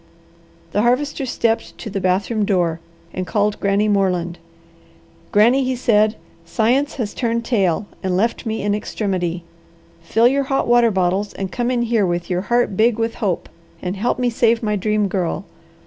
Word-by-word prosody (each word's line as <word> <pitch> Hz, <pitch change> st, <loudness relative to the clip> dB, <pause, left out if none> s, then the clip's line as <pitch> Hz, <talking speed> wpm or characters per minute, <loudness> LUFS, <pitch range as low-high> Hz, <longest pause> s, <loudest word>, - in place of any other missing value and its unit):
The 205 Hz, -, +1 dB
Harvester 265 Hz, +3 st, 0 dB
stepped 230 Hz, -1 st, -1 dB
to -, -, -8 dB
the 195 Hz, -2 st, -3 dB
bathroom 195 Hz, +4 st, +1 dB
door 175 Hz, -5 st, +1 dB, 0.3 s
and 185 Hz, 0 st, -4 dB
called 210 Hz, -1 st, 0 dB
Granny 200 Hz, +1 st, +1 dB
Moreland. 180 Hz, -4 st, 0 dB, 0.9 s
"Granny," 235 Hz, +6 st, +4 dB
he 260 Hz, 0 st, -1 dB
said, 215 Hz, -3 st, +2 dB, 0.3 s
"science 240 Hz, +11 st, +1 dB
has 220 Hz, -6 st, -3 dB
turned 235 Hz, -1 st, -1 dB
tail, 200 Hz, -6 st, +1 dB, 0.2 s
and 185 Hz, -2 st, 0 dB
left 230 Hz, +4 st, 0 dB
me 220 Hz, -1 st, -3 dB
in 205 Hz, 0 st, +1 dB
extremity. 185 Hz, -5 st, -2 dB, 0.6 s
Fill 225 Hz, +8 st, +3 dB
your 275 Hz, +2 st, +1 dB
hot 270 Hz, 0 st, 0 dB
water 240 Hz, -1 st, +5 dB
bottles 190 Hz, +1 st, 0 dB
and 190 Hz, -1 st, -5 dB
come 240 Hz, -1 st, -1 dB
in 245 Hz, -1 st, +1 dB
here 225 Hz, -4 st, +1 dB
with 175 Hz, +1 st, -2 dB
your 180 Hz, 0 st, 0 dB
heart 240 Hz, 0 st, +1 dB
big 225 Hz, +2 st, +3 dB
with 230 Hz, 0 st, -1 dB
hope 190 Hz, -6 st, -1 dB, 0.3 s
and 180 Hz, +1 st, -4 dB
help 220 Hz, +5 st, 0 dB
me 250 Hz, -1 st, 0 dB
save 230 Hz, 0 st, +2 dB
my 210 Hz, -1 st, 0 dB
Dream 210 Hz, +1 st, +1 dB
Girl. 185 Hz, -1 st, -2 dB
210 Hz, 170 wpm, -20 LUFS, 190-235 Hz, 0.9 s, water